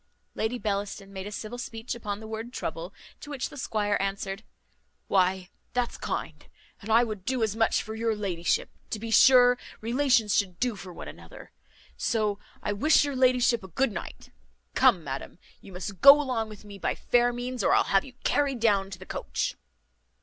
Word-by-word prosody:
Lady 220 +3 -1
Bellaston 200 -2 -3
made 190 0 -6
a - - -7
civil 220 +3 -6
speech 225 0 -5
upon 210 -3 -5
the 220 - -9
word 225 +2 -6
trouble; 170 -5 -5 0.3
to 290 - -10
which 275 -3 -3
the - - -12
squire 210 -6 0
answered 195 +1 -3 0.6
"Why, 185 0 +1 0.2
that's 245 -1 -1
kind - - -4 0.4
and 210 - -9
I 230 +2 +6
would 215 -5 -5
do 255 0 0
as 215 -1 0
much 225 0 +2
for 220 - -7
your 225 0 0
ladyship. 180 -5 -1 0.2
To - - -3
be 225 +1 -6
sure 245 0 +7 0.2
relations 235 -3 +2
should 185 -4 0
do 245 -3 0
for 185 -2 -9
one - - -9
another. - - -12 0.5
So 215 -4 0 0.2
I 205 - -1
wish 295 +8 +4
your 285 -2 -3
ladyship 250 -3 +3
a - - -8
good 235 +8 0
night. 195 - -8 0.4
Come, 175 - +4
madam, 135 +2 -6 0.2
you 195 - -13
must 185 +1 -7
go 280 +1 +10
along 250 -6 -1
with 210 -1 -12
me 200 -1 -10
by - - -1
fair 245 0 +2
means, 245 -1 -4
or - - +4
I'll - - +4
have 195 - +5
you 265 - -12
carried 280 -3 +1
down 200 -4 +2
to 190 - -7
the 190 - -11
coach." - - -3
220 Hz, 190 wpm, -27 LUFS, 195-245 Hz, 0.6 s, go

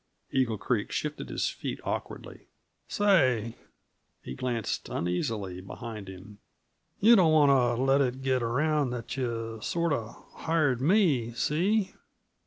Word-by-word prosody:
Eagle 125 -5 +1
Creek 105 +2 -1
shifted 150 0 -4
his - - -1
feet - - -5
awkwardly. - - -6 0.4
"Say" 130 - +2 0.7
he - - -6
glanced 120 - -3
uneasily 95 - -2
behind 105 +1 -8
him 95 +2 -11 0.6
"yuh 230 +4 +7
don't 175 -6 +5
want 135 -6 +4
t' 130 - 0
let 135 +1 +3
it 130 0 -1
get 130 -1 +1
around 140 +4 +1
that 120 -1 -5
yuh 115 -4 -4
sort 170 +5 0
of 115 -4 -4 0.2
hired 150 -7 +1
me 145 - +2
see?" 190 - 0
125 Hz, 130 wpm, -28 LUFS, 115-150 Hz, 0.7 s, yuh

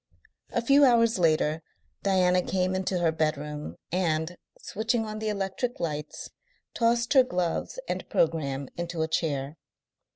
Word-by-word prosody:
A 235 - 0
few 280 +4 +5
hours 230 -5 +4
later 155 -1 +2 0.4
Diana 185 -2 +3
came 185 0 0
into 185 0 -1
her 170 -2 +2
bedroom, 150 -1 -2 0.2
and, 165 -1 0 0.2
switching 225 +2 -1
on 215 0 -5
the 220 0 -2
electric 210 +5 -2
lights, 150 -2 -4 0.4
tossed 235 +1 +2
her 265 - +8
gloves 180 - -2
and - - -4
programme 140 -4 0
into 170 -1 -2
a - - -1
chair. 150 -2 -2
180 Hz, 135 wpm, -27 LUFS, 160-220 Hz, 0.4 s, her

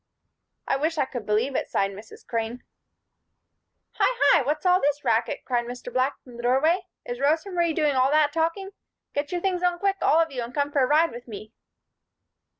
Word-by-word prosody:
"I - - +1
wish 315 +3 -1
I 285 - +2
could 245 -5 -7
believe 225 +6 +1
it," - - -1
sighed 195 0 0
Mrs. 205 +3 -13
Crane. 230 +1 -3 1.4
"Hi, - - +3
hi! 335 - +6
What's 300 +5 -2
all 360 0 +4
this 290 +1 0
racket?" - - 0
cried 240 -2 0
Mr. 245 0 -8
Black 255 +2 0
from 245 -2 -13
the - - -6
doorway. 310 +10 +2 0.2
"Is 245 0 -5
Rosa 315 +7 +1
Marie 340 -2 +1
doing 300 -2 +1
all 260 +1 +3
that 300 0 +3
talking? 335 +5 -1 0.4
Get 290 0 -2
your 355 -1 -2
things 365 -2 -1
on 355 -1 +1
quick, 390 +1 0
all 315 - +4
of 330 -2 +1
you, 255 -2 -4
and 235 +2 -7
come 285 0 0
for 285 - +2
a 255 - +3
ride 315 +4 +3
with 240 +1 -10
me." 215 0 -9
285 Hz, 205 wpm, -25 LUFS, 245-330 Hz, 1.4 s, hi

